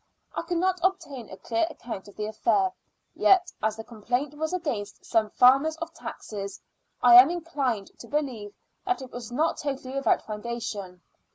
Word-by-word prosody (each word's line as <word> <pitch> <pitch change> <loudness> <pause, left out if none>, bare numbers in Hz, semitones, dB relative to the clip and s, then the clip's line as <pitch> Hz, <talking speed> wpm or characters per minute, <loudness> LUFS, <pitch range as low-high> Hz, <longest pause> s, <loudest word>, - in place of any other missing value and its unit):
I - - -2
could 345 +1 -2
not 370 +1 +1
obtain 335 - -1
a 190 - -9
clear 230 +9 0
account 230 - -7
of 205 - -14
the 210 - -3
affair, 210 -3 +1 0.4
yet, 365 -2 +4
as 215 0 +1
the 225 - -6
complaint 245 +6 -2
was 315 +1 -3
against 290 - -3
some 220 -2 +2
farmers 275 +8 +5
of 330 0 -6
taxes, 200 -2 -7 0.4
I 245 -1 +8
am 270 - +1
inclined 285 - -2
to - - -10
believe 250 -9 -3 0.3
that 370 -7 -1
it 255 - -10
was 240 -2 -7
not 310 +6 +1
totally 270 -3 -4
without 275 0 +2
foundation. 210 -5 -5
250 Hz, 170 wpm, -27 LUFS, 215-315 Hz, 0.4 s, I